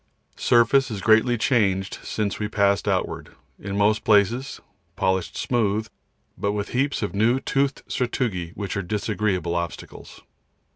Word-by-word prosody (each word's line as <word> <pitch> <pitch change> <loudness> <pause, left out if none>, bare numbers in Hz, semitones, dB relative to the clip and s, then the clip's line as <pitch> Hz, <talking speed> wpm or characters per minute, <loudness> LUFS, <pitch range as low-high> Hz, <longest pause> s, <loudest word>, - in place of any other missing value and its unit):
The - - -16
surface 120 +3 +4
is 105 -3 -4
greatly 110 +4 +4
changed 100 -6 +1
since 105 -2 -3
we 105 - -1
passed 100 -1 +1
outward, - - -2 0.2
in 100 0 -5
most 105 +2 +2
places 115 +6 +2 0.4
polished 95 -2 -1
smooth, 110 -3 0 0.5
but 100 0 -1
with 105 -1 -3
heaps 135 0 0
of 105 - -3
new 115 +6 +2
toothed 135 0 -1
sastrugi 115 -8 -2
which 100 0 -4
are 100 - -1
disagreeable 100 -2 -1
obstacles. 85 -1 -6
105 Hz, 140 wpm, -24 LUFS, 100-120 Hz, 0.5 s, surface